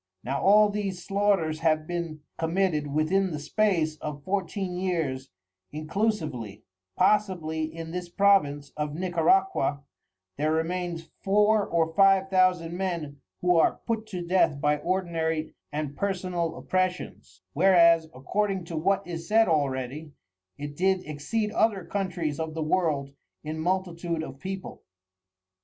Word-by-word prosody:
Now 135 Hz, +2 st, -2 dB
all 210 Hz, +2 st, +6 dB
these 200 Hz, -3 st, -3 dB
Slaughters 195 Hz, -6 st, +1 dB
have 155 Hz, -1 st, +2 dB
been 170 Hz, -3 st, -4 dB, 0.2 s
committed 165 Hz, -2 st, 0 dB
within 155 Hz, +7 st, +1 dB
the 155 Hz, -, -4 dB
space 160 Hz, 0 st, 0 dB
of 150 Hz, -2 st, -6 dB
Fourteen 190 Hz, -1 st, -2 dB
years 160 Hz, -8 st, -2 dB, 0.4 s
inclusively, 155 Hz, -, -2 dB, 0.3 s
possibly 175 Hz, -7 st, +1 dB
in 160 Hz, +1 st, -7 dB
this 180 Hz, 0 st, -5 dB
Province 170 Hz, -8 st, +2 dB
of 150 Hz, -1 st, -3 dB
Nicaraqua 175 Hz, -4 st, +1 dB, 0.5 s
there 155 Hz, +2 st, +1 dB
remains 165 Hz, 0 st, -2 dB
Four 210 Hz, +1 st, +3 dB
or 165 Hz, -1 st, 0 dB
Five 195 Hz, +1 st, +4 dB
Thousand 180 Hz, -3 st, +2 dB
Men 170 Hz, -7 st, -3 dB, 0.2 s
who 180 Hz, -1 st, +3 dB
are 165 Hz, -, +3 dB
put 225 Hz, -2 st, -2 dB
to 180 Hz, -4 st, -5 dB
Death 170 Hz, -5 st, +2 dB
by 150 Hz, +1 st, +2 dB
ordinary 165 Hz, -3 st, -1 dB, 0.2 s
and 150 Hz, -1 st, -3 dB
personal 180 Hz, -3 st, -2 dB
Opressions, 180 Hz, -, -3 dB
whereas 170 Hz, -1 st, +5 dB
(according 185 Hz, +7 st, -2 dB
to 165 Hz, -1 st, -5 dB
what 195 Hz, +4 st, +1 dB
is 165 Hz, -1 st, -6 dB
said 225 Hz, +1 st, +4 dB
already) 140 Hz, -1 st, -1 dB, 0.4 s
it 145 Hz, 0 st, -6 dB
did 190 Hz, +2 st, +1 dB
exceed 210 Hz, +9 st, -2 dB
other 205 Hz, -6 st, +1 dB
Countries 175 Hz, -7 st, -2 dB
of 160 Hz, -1 st, -4 dB
the 160 Hz, -, -1 dB
World 155 Hz, -5 st, 0 dB, 0.3 s
in 155 Hz, +1 st, -5 dB
multitude 170 Hz, -1 st, -1 dB
of 135 Hz, -3 st, -9 dB
People. 190 Hz, +2 st, -6 dB
170 Hz, 130 wpm, -27 LUFS, 155-190 Hz, 0.5 s, all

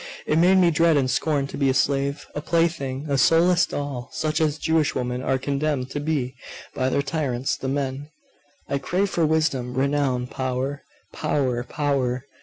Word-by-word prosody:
It 155 Hz, -, +2 dB
made 185 Hz, +3 st, +5 dB
me 175 Hz, -2 st, +5 dB
dread 165 Hz, 0 st, +3 dB
and 130 Hz, -2 st, +1 dB
scorn 140 Hz, +2 st, +1 dB
to 140 Hz, -, -7 dB
be 140 Hz, -2 st, +3 dB
a 130 Hz, -, +1 dB
slave, 140 Hz, +1 st, 0 dB
a 150 Hz, -, -4 dB
plaything, 150 Hz, -5 st, 0 dB
a 140 Hz, -2 st, +1 dB
soul 165 Hz, +5 st, +5 dB
less 180 Hz, 0 st, +3 dB
doll, 140 Hz, -4 st, -5 dB
such 155 Hz, +1 st, -1 dB
as 155 Hz, -1 st, +1 dB
Jewish 160 Hz, -1 st, +1 dB
women 125 Hz, 0 st, -2 dB
are 130 Hz, -, +1 dB
condemned 140 Hz, -1 st, -2 dB
to 145 Hz, -, -3 dB
be 145 Hz, -4 st, -1 dB, 0.4 s
by 130 Hz, 0 st, 0 dB
their 140 Hz, -, +1 dB
tyrants, 135 Hz, -5 st, -1 dB
the 135 Hz, -, -5 dB
men. 140 Hz, +1 st, -2 dB, 0.6 s
I 140 Hz, -, -1 dB
craved 185 Hz, +8 st, 0 dB
for 165 Hz, -2 st, +2 dB
wisdom, 145 Hz, -6 st, 0 dB
renown, 135 Hz, -2 st, +1 dB
power 130 Hz, +2 st, -3 dB, 0.3 s
power 125 Hz, -4 st, 0 dB
power! 130 Hz, -2 st, -1 dB
140 Hz, 180 wpm, -24 LUFS, 130-155 Hz, 0.6 s, made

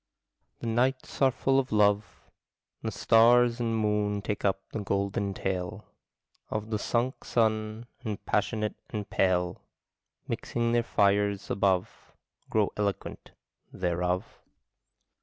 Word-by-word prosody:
The -, -, -5 dB
nights 130 Hz, +5 st, 0 dB
are 135 Hz, -, +7 dB
full 135 Hz, +1 st, +2 dB
of 130 Hz, -1 st, -2 dB
love; 105 Hz, -1 st, +2 dB, 0.6 s
The -, -, -2 dB
stars 120 Hz, +1 st, +5 dB
and 115 Hz, -1 st, 0 dB
moon 105 Hz, -1 st, 0 dB
take 105 Hz, -1 st, -3 dB
up 95 Hz, -1 st, +1 dB
the -, -, -3 dB
golden 100 Hz, 0 st, -1 dB
tale 95 Hz, +3 st, -3 dB, 0.6 s
Of 110 Hz, +1 st, -4 dB
the 105 Hz, -, 0 dB
sunk 120 Hz, +4 st, -1 dB
sun, 110 Hz, 0 st, 0 dB, 0.2 s
and 105 Hz, -4 st, -5 dB
passionate 105 Hz, +1 st, 0 dB, 0.2 s
and 105 Hz, -2 st, -4 dB
pale, 90 Hz, -2 st, +1 dB, 0.7 s
Mixing 115 Hz, 0 st, -1 dB
their 120 Hz, 0 st, +3 dB
fires 100 Hz, -2 st, +1 dB
above, 95 Hz, -2 st, 0 dB, 0.3 s
Grow 105 Hz, -2 st, +2 dB
eloquent 100 Hz, -2 st, -3 dB, 0.4 s
thereof. 90 Hz, 0 st, -2 dB
105 Hz, 120 wpm, -28 LUFS, 100-115 Hz, 0.7 s, are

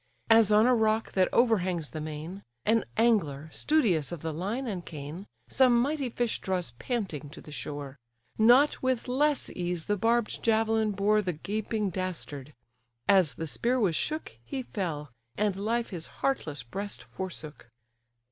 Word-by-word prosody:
As 225 Hz, -2 st, +7 dB
on 210 Hz, +2 st, +6 dB
a 250 Hz, -, +5 dB
rock 220 Hz, -1 st, +2 dB
that 185 Hz, -1 st, +2 dB
overhangs 185 Hz, -, +2 dB
the 155 Hz, -, -5 dB
main, 155 Hz, +5 st, -6 dB, 0.2 s
An 225 Hz, +1 st, +3 dB
angler, 165 Hz, -11 st, +2 dB
studious 195 Hz, -, +2 dB
of 170 Hz, -3 st, -6 dB
the 160 Hz, -1 st, -2 dB
line 205 Hz, -, -2 dB
and 195 Hz, -7 st, -3 dB
cane, 155 Hz, +6 st, -8 dB, 0.2 s
Some 250 Hz, -3 st, +4 dB
mighty 280 Hz, +1 st, 0 dB
fish 240 Hz, -1 st, -1 dB
draws 185 Hz, -8 st, -1 dB
panting 160 Hz, -, -4 dB
to -, -, -11 dB
the 150 Hz, -, -12 dB
shore: 145 Hz, -2 st, -6 dB, 0.4 s
Not 245 Hz, +7 st, +5 dB
with 260 Hz, -2 st, 0 dB
less 285 Hz, +3 st, +1 dB
ease 175 Hz, -2 st, -3 dB
the 205 Hz, -, 0 dB
barbed 230 Hz, +2 st, +1 dB
javelin 220 Hz, -1 st, +2 dB
bore 210 Hz, +2 st, +3 dB
The 185 Hz, -3 st, -2 dB
gaping 210 Hz, +4 st, -2 dB
dastard; 155 Hz, -7 st, -4 dB, 0.5 s
as 180 Hz, -10 st, +4 dB
the 165 Hz, -, -4 dB
spear 240 Hz, -, 0 dB
was 190 Hz, -8 st, +2 dB
shook, 305 Hz, -, -3 dB
He 260 Hz, -, -4 dB
fell, 160 Hz, -, -4 dB, 0.3 s
and 205 Hz, -2 st, +1 dB
life 225 Hz, +4 st, -1 dB
his 170 Hz, -3 st, -4 dB
heartless 155 Hz, -, -2 dB
breast 200 Hz, +12 st, -5 dB
forsook. 155 Hz, -9 st, -8 dB
200 Hz, 155 wpm, -29 LUFS, 160-230 Hz, 0.5 s, As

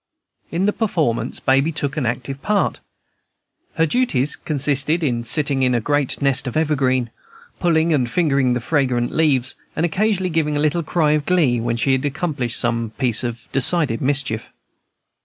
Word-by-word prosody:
In 175 Hz, +4 st, -1 dB
the 205 Hz, -, +1 dB
performance 160 Hz, -, -1 dB
Baby 135 Hz, +4 st, +2 dB
took 145 Hz, -3 st, -3 dB
an 145 Hz, -6 st, -1 dB
active 130 Hz, +4 st, -4 dB
part. 210 Hz, -1 st, 0 dB, 1.0 s
Her 165 Hz, -, +3 dB
duties 150 Hz, -, 0 dB
consisted 150 Hz, +2 st, 0 dB
in 120 Hz, -5 st, -1 dB
sitting 140 Hz, +2 st, 0 dB
in 125 Hz, -1 st, +2 dB
a -, -, +2 dB
great 145 Hz, +3 st, 0 dB
nest 135 Hz, -1 st, +2 dB
of 125 Hz, -, -3 dB
evergreen, 130 Hz, -6 st, 0 dB, 0.5 s
pulling 165 Hz, -2 st, +2 dB
and 125 Hz, -5 st, +1 dB
fingering 140 Hz, -4 st, +1 dB
the 125 Hz, -, -2 dB
fragrant 125 Hz, -3 st, 0 dB
leaves, 140 Hz, -5 st, +1 dB, 0.2 s
and 160 Hz, -, +1 dB
occasionally 190 Hz, +1 st, 0 dB
giving 150 Hz, -2 st, 0 dB
a -, -, 0 dB
little 155 Hz, +3 st, +1 dB
cry 155 Hz, -1 st, +1 dB
of 150 Hz, -1 st, 0 dB
glee 155 Hz, -10 st, +2 dB
when 120 Hz, 0 st, -1 dB
she 135 Hz, +3 st, +1 dB
had 130 Hz, 0 st, +1 dB
accomplished 140 Hz, -4 st, -2 dB
some 115 Hz, -2 st, -1 dB
piece 125 Hz, -3 st, +2 dB
of 120 Hz, -1 st, -5 dB
decided 135 Hz, -2 st, +3 dB
mischief. 135 Hz, -5 st, -1 dB
140 Hz, 165 wpm, -20 LUFS, 125-160 Hz, 1.0 s, Her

